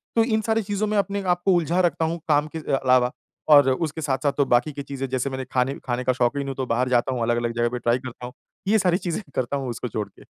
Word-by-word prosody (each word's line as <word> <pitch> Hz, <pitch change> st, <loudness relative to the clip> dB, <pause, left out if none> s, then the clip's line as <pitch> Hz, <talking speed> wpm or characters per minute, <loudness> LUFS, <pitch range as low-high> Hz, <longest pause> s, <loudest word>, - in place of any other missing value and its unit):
तो 225 Hz, -, +5 dB
इन 220 Hz, -2 st, +1 dB
सारी 225 Hz, +1 st, +1 dB
चीजों 205 Hz, +2 st, -1 dB
में 210 Hz, -, 0 dB
अपने 200 Hz, 0 st, 0 dB
आप 175 Hz, -1 st, +1 dB
को 190 Hz, -, +5 dB
उलझा 175 Hz, +1 st, +1 dB
रखता 165 Hz, -2 st, +1 dB
हूँ, 165 Hz, +1 st, -2 dB
काम 150 Hz, -1 st, +3 dB
के 160 Hz, -, -2 dB
अ, 145 Hz, -, -1 dB
अलावा 125 Hz, -1 st, +3 dB, 0.4 s
और 145 Hz, -3 st, +7 dB
उसके 160 Hz, +3 st, -2 dB
साथ-साथ 140 Hz, 0 st, 0 dB
तो 140 Hz, -, +3 dB
बाकी 125 Hz, +5 st, +2 dB
की 140 Hz, 0 st, -6 dB
चीज़ें 135 Hz, -1 st, -5 dB
जैसे 130 Hz, +1 st, -1 dB
मैंने 130 Hz, -1 st, -5 dB
खाने 130 Hz, +2 st, +1 dB
खाने 125 Hz, 0 st, -2 dB
का 130 Hz, -, +2 dB
शौकीन 130 Hz, +3 st, 0 dB
हूँ, 135 Hz, -, -4 dB
तो 130 Hz, 0 st, -2 dB
बाहर 125 Hz, +2 st, 0 dB
जाता 125 Hz, +1 st, +2 dB
हूँ 125 Hz, -, -3 dB
अलग-अलग 120 Hz, 0 st, 0 dB
जगह 120 Hz, 0 st, +2 dB
पे 125 Hz, +1 st, -4 dB
ट्राई 120 Hz, 0 st, +2 dB
करता 125 Hz, -1 st, -8 dB
हूँ। 125 Hz, -, -8 dB, 0.3 s
ये 220 Hz, +2 st, +4 dB
सारी 180 Hz, -3 st, +2 dB
चीज़ें 175 Hz, 0 st, -3 dB
करता 130 Hz, +2 st, -1 dB
हूँ 135 Hz, -2 st, -4 dB
उसको 120 Hz, +1 st, -4 dB
छोड़ 105 Hz, -1 st, -3 dB
के। -, -, -19 dB
135 Hz, 270 wpm, -24 LUFS, 125-170 Hz, 0.4 s, और